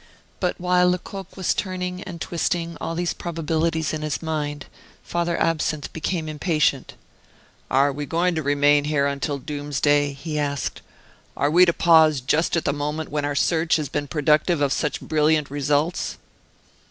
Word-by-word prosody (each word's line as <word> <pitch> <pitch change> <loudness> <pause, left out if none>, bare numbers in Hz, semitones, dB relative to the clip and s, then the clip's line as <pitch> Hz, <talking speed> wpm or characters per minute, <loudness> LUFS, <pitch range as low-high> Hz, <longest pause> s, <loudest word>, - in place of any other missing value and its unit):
But 180 -2 -1
while 180 0 +3
Lecoq 190 +1 -5
was 185 - +1
turning 180 -1 -3
and 175 -2 -8
twisting 170 0 -2
all 165 - -3
these 175 0 -1
probabilities 160 -1 -1
in 155 - -3
his 150 -2 -2
mind, 150 -3 -3 0.4
Father 170 0 -1
Absinthe 155 -2 -1
became 160 0 -2
impatient. 155 -3 0 0.7
"Are 140 +2 +3
we 145 +1 -5
going 175 +3 +1
to 160 - -1
remain 145 0 +3
here 150 -2 +1
until 140 +1 -2
doomsday?" 145 0 0
he 150 +2 -4
asked. 140 -2 -2 0.6
"Are 145 - +1
we 180 +3 +7
to 170 - +2
pause 160 -4 +5
just 155 +7 +1
at 165 - -2
the 140 - +1
moment 150 +2 -3
when 145 -1 -1
our 145 0 -2
search 165 +2 +2
has 155 -3 -2
been 145 -1 -2
productive 150 +3 +2
of 140 -2 +2
such 150 - -2
brilliant 155 -2 +1
results?" 145 +4 0
155 Hz, 160 wpm, -23 LUFS, 145-170 Hz, 0.7 s, we